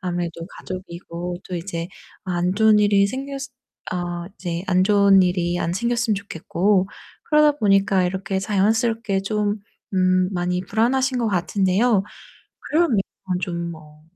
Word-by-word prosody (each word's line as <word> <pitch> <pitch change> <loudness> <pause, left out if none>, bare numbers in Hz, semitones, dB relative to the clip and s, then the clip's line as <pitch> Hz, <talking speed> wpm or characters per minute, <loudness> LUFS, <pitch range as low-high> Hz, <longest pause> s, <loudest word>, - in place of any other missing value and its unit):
아무래도 175 -3 -3
가족이고 175 -1 -6
또 185 - -4
이제 170 -1 -4 0.4
안 180 -1 0
좋은 215 0 +5
일이 200 -1 +4
생겼을 275 +3 -5 0.4
어 175 -1 -3
이제 175 -2 -4
안 185 0 +3
좋은 200 -1 +5
일이 175 -1 0
안 170 - -1
생겼으면 235 +2 0
좋겠고. 195 0 0 0.4
그러다 300 -1 +4
보니까 195 -3 +3
이렇게 190 +1 -2
자연스럽게 215 0 +1
좀 210 +1 -1 0.3
음 185 0 +3
많이 180 0 -1
불안하신 255 +6 +1
것 230 -2 0
같은데요. 195 +3 +2 0.7
그러면 320 -7 +3 0.4
좀 170 -2 -3
뭐 150 -1 -14
195 Hz, 285 characters per minute, -22 LUFS, 175-215 Hz, 0.7 s, 좋은